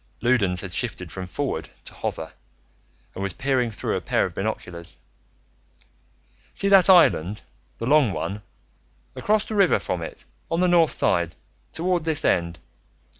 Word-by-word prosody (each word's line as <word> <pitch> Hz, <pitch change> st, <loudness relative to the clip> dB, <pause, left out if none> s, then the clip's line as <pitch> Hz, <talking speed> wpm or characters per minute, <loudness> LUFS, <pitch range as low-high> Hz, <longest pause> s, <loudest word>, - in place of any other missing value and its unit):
Loudons 105 Hz, -8 st, +2 dB
had 95 Hz, -, -6 dB
shifted -, -, -2 dB
from 95 Hz, -1 st, -6 dB
Forward 90 Hz, -, -3 dB, 0.2 s
to -, -, -8 dB
Hover -, -, -5 dB, 0.8 s
and -, -, -7 dB
was 100 Hz, -2 st, -1 dB
peering 130 Hz, -3 st, 0 dB
through 110 Hz, -, -3 dB
a -, -, -2 dB
pair -, -, +1 dB
of -, -, -6 dB
binoculars. 85 Hz, -1 st, -4 dB, 1.6 s
"See 200 Hz, -, 0 dB
that 195 Hz, -2 st, +7 dB
island, 105 Hz, -, +4 dB, 0.3 s
the 115 Hz, -, -4 dB
long 140 Hz, -3 st, +4 dB
one? 100 Hz, +2 st, -4 dB, 0.7 s
Across 215 Hz, 0 st, +1 dB
the -, -, -6 dB
river 195 Hz, -4 st, +4 dB
from 90 Hz, -, -3 dB
it, 80 Hz, -, -8 dB, 0.2 s
on 165 Hz, -, 0 dB
the 180 Hz, -, +3 dB
north 170 Hz, -3 st, +4 dB
side, 85 Hz, -2 st, 0 dB, 0.4 s
toward 175 Hz, 0 st, -1 dB
this 160 Hz, -1 st, -1 dB
end. 85 Hz, -1 st, +1 dB
125 Hz, 150 wpm, -24 LUFS, -, 1.6 s, that